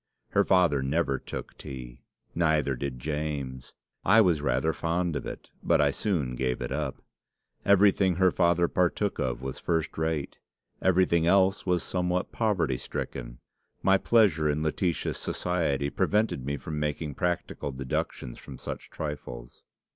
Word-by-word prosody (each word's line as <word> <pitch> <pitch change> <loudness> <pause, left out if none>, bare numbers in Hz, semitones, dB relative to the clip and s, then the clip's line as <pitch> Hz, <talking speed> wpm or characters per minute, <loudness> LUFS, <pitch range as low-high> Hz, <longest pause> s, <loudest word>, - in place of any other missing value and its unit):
Her - - +3
father 85 -7 +3
never 70 0 0
took - - -7
tea; 60 -3 -8 0.3
neither 80 -5 +2
did 65 0 -4
James. 70 -2 -4 0.3
I 115 - +6
was 90 -8 +4
rather 70 +4 +1
fond 85 0 -1
of - - -3
it, - - -8
but - - +3
I - - +4
soon 80 -12 -1
gave 65 0 -1
it - - -4
up. 75 -3 -3 0.6
Everything 100 -2 +5
her 95 0 +4
father 85 0 +3
partook 90 +4 0
of 65 0 -2
was 65 -1 -4
first 80 -3 -1
rate. 80 -3 -2 0.4
Everything 90 -3 +3
else 95 +2 +3
was 90 -2 +2
somewhat 90 0 -1
poverty 90 - +1
stricken. - - -6 0.4
My 95 0 +5
pleasure 95 -11 +3
in 75 +1 0
Laetitia's 85 +2 -1
society 75 -6 -1
prevented 105 - +1
me 70 0 -1
from 75 +2 -5
making 75 0 -2
practical 90 -3 -2
deductions 65 -2 -4
from 65 - -10
such - - -7
trifles." 65 -5 -7
80 Hz, 145 wpm, -28 LUFS, 70-90 Hz, 0.6 s, I